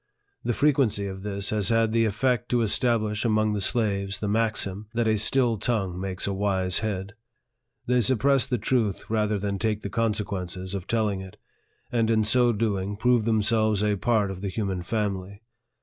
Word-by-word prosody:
The 120 - 0
frequency 135 -9 +2
of 95 -1 -6
this 100 -1 -3
has 105 -3 +1
had 115 -1 +2
the 115 0 +2
effect 120 +3 0
to 120 -1 +2
establish 110 -1 0
among 110 -2 +2
the 105 - -2
slaves 100 -3 0
the 105 - -2
maxim, 105 -2 -1
that 115 -1 +1
a 110 - +3
still 115 +1 +1
tongue 95 -7 -1
makes 95 -1 -3
a 100 - -1
wise 95 -2 +1
head. 100 -3 -3 0.7
They 125 0 +2
suppress 130 +4 +3
the 125 -2 0
truth 110 -3 -1
rather 105 -1 +1
than 100 0 -3
take 110 -1 -1
the 100 - -6
consequences 100 -4 -2
of 95 -2 -5
telling 105 -4 0
it, 95 -1 -11 0.5
and 115 -2 +1
in 110 -1 +3
so 120 +2 +3
doing 105 -3 -1
prove 120 0 +2
themselves 110 -1 +2
a 105 -1 +2
part 105 -1 +1
of 95 -1 -8
the 100 - -3
human 95 -2 -2
family. 100 0 -3
105 Hz, 180 wpm, -26 LUFS, 100-115 Hz, 0.7 s, a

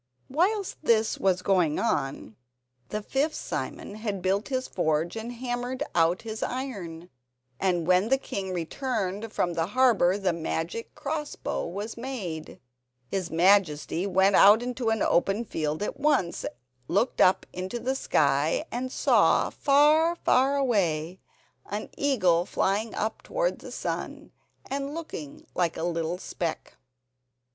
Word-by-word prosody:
Whilst 380 +7 +1
this 225 -6 +2
was 185 -2 +1
going 180 -6 +2
on 135 -5 -1 0.5
the 210 0 -3
fifth 285 +7 0
Simon - - -5
had 210 -3 -3
built 195 +3 +1
his 260 -1 -2
forge 160 0 0
and 225 +2 -5
hammered 245 +2 -3
out 170 +3 +2
his 220 -1 -6
iron, 185 -10 -5 0.5
and 180 -3 +1
when 185 +5 +3
the 270 - +4
king 195 -7 -5
returned 205 - -3
from 175 -5 0
the 165 0 0
harbour 220 -8 +4
the 190 -3 0
magic 165 +6 -4
cross 300 0 -4
bow - - -3
was 205 +7 -5
made. 210 -11 -5 0.5
His 185 -3 -2
Majesty 175 0 +3
went 190 +1 +4
out 210 +4 +7
into 245 -1 -2
an 225 -2 +1
open 195 +6 +2
field 155 -1 -2
at - - -4
once, 275 - +1 0.4
looked 205 +8 +1
up 185 - +4
into 185 +6 -4
the 255 +3 -1
sky 150 - +1
and 255 +2 -3
saw, - - +3
far, 305 +4 +4
far 270 -3 +3
away, 185 - 0 0.5
an 205 +1 -4
eagle 185 -12 +2
flying 210 +3 0
up 220 +1 -2
towards - - -1
the - - -10
sun - - -5 0.4
and 280 +2 -3
looking 170 - -7
like 175 -2 0
a - - -3
little 170 0 -1
speck. 170 -3 -5
200 Hz, 140 wpm, -27 LUFS, 175-255 Hz, 0.5 s, out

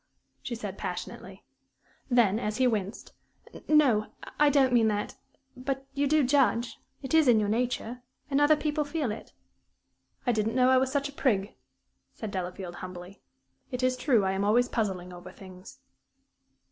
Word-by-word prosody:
she 240 - -5
said, 205 -4 -7
passionately. - - -6 0.7
Then, 230 -4 +3
as 215 -2 -3
he 260 - +3
winced, 215 -3 -2 0.5
"No, 265 -9 +4 0.3
I 295 0 +6
don't 270 -3 +3
mean 230 -2 +4
that. 210 +3 -2 0.4
But 270 +1 -4
you 285 +1 0
do 305 +1 +3
judge 245 -3 +1 0.2
it 265 - -5
is 320 -3 +5
in 235 -3 +6
your 205 -1 0
nature 245 +1 -2 0.3
and 280 0 +1
other 295 +1 +6
people 300 0 -1
feel 290 -5 -2
it." 210 - -8 0.9
"I 245 - +3
didn't 220 0 -1
know 255 0 +4
I 260 - +5
was 260 0 0
such 285 0 0
a - - -9
prig," 210 -8 0 0.6
said 215 -3 -6
Delafield, 180 -1 -5
humbly. 185 +1 -9 0.5
"It 250 0 -4
is 255 0 +2
true 250 -5 +2
I 190 - +1
am 195 +1 -1
always 235 +4 +3
puzzling 190 -7 -3
over 175 0 -10
things." 190 +8 -13
240 Hz, 165 wpm, -28 LUFS, 205-270 Hz, 0.9 s, I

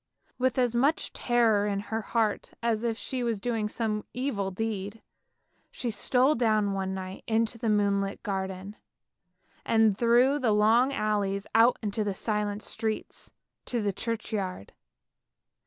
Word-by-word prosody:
" - - -44
With 260 +1 +1
as 245 -2 +2
much 280 +6 +1
terror 225 -4 +2
in 200 -1 -1
her 225 - 0
heart, 220 -1 -1
as 230 -1 0
if 230 -2 -1
she 255 +1 -3
were 235 -1 +1
doing 220 0 -2
some 215 -2 -2
evil 245 -7 -1
deed, 205 +1 -4 0.7
she 240 - -3
stole 255 +6 +3
down 215 -5 +2
one 190 -1 -2
night 185 0 -7
into 225 0 0
the 230 -1 -1
moonlit 200 -1 +1
garden, 190 0 -4 0.9
and 220 -3 +3
through 245 +6 +4
the 235 -6 +2
long 225 +5 +4
alleys 205 -5 -1
out 230 +2 +5
into 210 +1 -1
the 200 -2 -2
silent 210 0 -2
streets 220 -1 -4 0.3
to 240 - -1
the 200 -1 0
churchyard. 210 - -4
220 Hz, 145 wpm, -28 LUFS, 200-235 Hz, 0.9 s, out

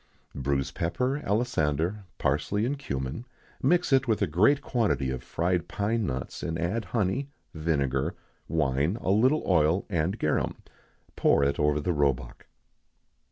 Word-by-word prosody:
_ 70 - -5
Bruise 70 0 0
pepper, 125 - -1
alisander, 100 - 0
parsley, 100 +10 0
and 140 +3 -2
cummin; 65 - -4 0.4
mix 175 +5 +2
with 135 -2 +3
it 110 - +1
a - - +4
great 105 - +4
quantity 90 - 0
of 65 -1 -4
fried 85 +5 -1
pine 105 +1 -1
nuts; 65 -1 -4
and 80 - -2
add 90 +8 -1
honey, 120 +6 -1 0.2
vinegar, 70 -5 0 0.3
wine, 75 - +1
a 95 - +1
little 130 +9 +3
oil, 85 +1 +3
and 85 +4 0
garum. 75 - 0 0.6
Pour 70 - +3
it 70 0 +1
over 75 0 +2
the 85 +4 0
roebuck. 70 -5 -1
85 Hz, 145 wpm, -27 LUFS, 70-115 Hz, 0.6 s, a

